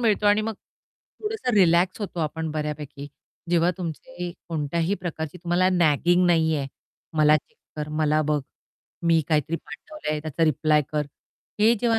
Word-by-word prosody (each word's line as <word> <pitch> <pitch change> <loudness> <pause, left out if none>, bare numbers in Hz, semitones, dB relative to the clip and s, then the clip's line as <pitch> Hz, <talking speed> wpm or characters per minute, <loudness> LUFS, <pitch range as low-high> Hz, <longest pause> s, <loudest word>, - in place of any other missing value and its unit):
मिळतो 215 -3 +2
आणि 205 +1 +5
मग 225 0 -3
थोडंसं 425 - -6
रिलॅक्स 180 0 +4
होतो 185 -4 -4
आपण 160 +1 -2
बऱ्यापैकी, 150 -2 -4 0.4
जेव्हा 175 0 +4
तुमचे 175 - -5 0.2
कोणत्याही 165 +3 0
प्रकारची 160 -1 -5
तुम्हाला 175 +1 +2
नॅगिंग 175 +1 +3
नाहीये, 160 -4 +2 0.5
"मला 155 0 +6
चेक 150 - -11 0.2
कर, 150 0 -3
मला 155 0 +3
बघ, 150 -1 +1 0.6
मी 165 -1 +4
काहीतरी 155 +1 +1
पाठवलंय 155 - -6
त्याचा 155 +1 0
रिप्लाय 155 0 +3
कर!" 150 -1 0 0.5
हे 225 +3 +6
जेव्हा 230 -2 +3
165 Hz, 140 wpm, -25 LUFS, 150-185 Hz, 0.6 s, मला